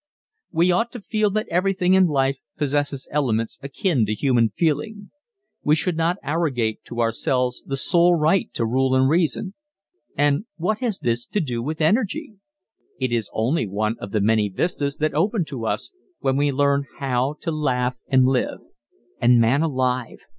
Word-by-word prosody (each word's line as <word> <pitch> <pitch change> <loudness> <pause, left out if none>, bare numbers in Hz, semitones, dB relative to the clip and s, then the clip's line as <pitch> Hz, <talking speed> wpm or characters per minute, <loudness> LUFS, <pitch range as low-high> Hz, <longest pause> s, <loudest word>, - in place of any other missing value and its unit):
We 175 +2 +3
ought 230 +7 +1
to 245 - -6
feel 215 0 0
that 215 +2 -2
everything 185 0 +2
in 190 -1 +5
life 135 -3 0 0.2
possesses 145 -2 -1
elements 115 -6 -1
akin 140 - 0
to 105 - -1
human 120 -3 +2
feeling. 165 - -2 0.5
We 150 - +3
should 160 +2 -1
not 165 +3 +1
arrogate 135 -9 -1
to 120 0 -4
ourselves 125 +2 0
the 135 - -2
sole 175 +5 +4
right 165 +4 +2
to 115 - 0
rule 130 +3 +1
and 130 0 +4
reason. 170 +5 +1 0.6
And 145 +6 +2
what 195 +6 -1
has 235 -6 -1
this 120 -3 -1
to 210 - -1
do 125 -8 -2
with 155 +6 -4
energy? 225 - +1 0.7
It 130 -2 -1
is 115 -3 -1
only 115 +3 0
one 105 +3 -1
of 100 - -7
the 105 - 0
many 110 0 +2
vistas 140 - -2
that 155 0 0
open 185 +4 +1
to 125 -7 -5
us - - -2 0.3
when 135 -1 0
we 145 +1 +2
learn 140 0 +1
how 135 +1 -1
to 165 - -2
laugh 130 -5 0
and 130 -1 +4
live. 130 -1 +1 0.6
And 120 0 +5
man 115 +6 +3
alive! 130 -5 -1
140 Hz, 170 wpm, -22 LUFS, 125-170 Hz, 0.7 s, in